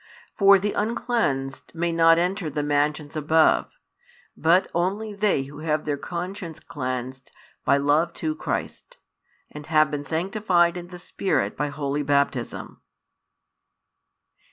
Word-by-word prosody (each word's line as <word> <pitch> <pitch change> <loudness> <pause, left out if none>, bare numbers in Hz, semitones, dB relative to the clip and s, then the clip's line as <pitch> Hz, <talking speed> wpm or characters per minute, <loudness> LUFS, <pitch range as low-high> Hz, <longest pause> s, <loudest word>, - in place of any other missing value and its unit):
For 200 -1 +7
the 205 +2 -2
uncleansed 205 - -2
may 170 +1 0
not 165 0 +5
enter 180 0 0
the 150 0 -2
mansions 145 +1 0
above, 155 +1 +3 0.7
but 175 +4 +3
only 200 +5 -1
they 200 -8 +1
who 145 +2 -11
have 155 -1 -1
their 145 -2 0
conscience 175 +2 -6
cleansed 130 -2 -5 0.3
by 140 - +4
love 145 +4 +2
to 155 -1 -2
Christ, 155 - -5 0.5
and 150 -1 -9
have 155 -2 +3
been 145 -1 -3
sanctified 175 +1 +1
in 175 -1 -6
the 180 0 -10
Spirit 175 - -1
by 150 - -1
Holy 145 0 -2
Baptism. 140 -3 -1
160 Hz, 130 wpm, -24 LUFS, 145-180 Hz, 0.7 s, For